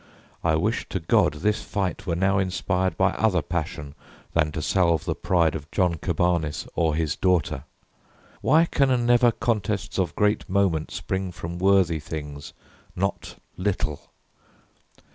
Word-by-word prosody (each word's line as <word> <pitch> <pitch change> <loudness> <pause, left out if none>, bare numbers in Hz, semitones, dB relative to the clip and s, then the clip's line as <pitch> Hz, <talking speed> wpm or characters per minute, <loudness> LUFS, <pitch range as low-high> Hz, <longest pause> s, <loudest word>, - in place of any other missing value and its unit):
I 80 - +3
wish 105 +9 -1
to 95 - -2
God 80 -2 +2
this 105 +8 0
fight 95 -2 -3
were 85 - 0
now 95 +2 +2
inspired 95 -1 -1
By 95 0 +3
other 95 -7 +1
passion 80 -4 -4 0.4
than 75 -2 +2
to 80 - -3
salve 85 -1 +2
the 85 - 0
pride 85 -2 +1
Of 75 -2 -6
John 90 -3 +1
Cabanis 85 -3 0
or 80 -2 +1
his 80 -2 0
daughter. 90 -7 0 0.8
Why 160 +2 +4
Can 130 -6 +1
never 120 0 +5
contests 105 -3 -2
of 90 - -1
great 105 0 +1
moment 95 -5 +1
spring 95 -1 -3
From 85 0 -6
worthy 95 -4 +3
things, 75 -2 -7 0.4
not 100 +2 -3 0.2
little? 90 -6 -2
90 Hz, 145 wpm, -25 LUFS, 80-100 Hz, 0.8 s, never